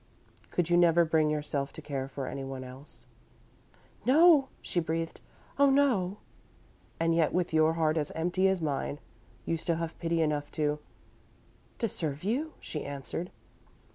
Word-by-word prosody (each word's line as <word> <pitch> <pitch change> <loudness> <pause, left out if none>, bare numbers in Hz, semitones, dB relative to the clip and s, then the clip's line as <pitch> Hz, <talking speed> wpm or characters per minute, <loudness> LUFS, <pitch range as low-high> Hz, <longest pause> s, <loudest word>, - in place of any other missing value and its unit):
Could 175 -3 0
you 175 - +5
never 170 -1 +5
bring 155 -1 +2
yourself 145 -2 -2
to - - -8
care 135 -2 -3
for 135 0 -5
anyone 135 -1 -5
else?" 130 -1 -11 1.0
"No," 295 +3 +6 0.2
she 175 - 0
breathed. 165 0 -3 0.4
"Oh, 280 0 +6
no!" 245 -9 +2 0.8
"And 165 0 +2
yet, 165 -2 +2
with 180 -2 0
your 155 0 +4
heart 160 -1 +1
as 150 -2 0
empty 180 +3 +2
as 190 -3 +1
mine 145 -1 -2 0.5
you 165 - 0
still 165 +1 -1
have 165 0 -4
pity 165 -1 +1
enough 150 -1 -1
to 150 -1 0 0.5
" - - -32
"To 230 - 0
serve 155 -6 -4
you," 270 +11 -1
she 150 - -5
answered. 140 +5 -5
165 Hz, 155 wpm, -30 LUFS, 150-180 Hz, 1.0 s, No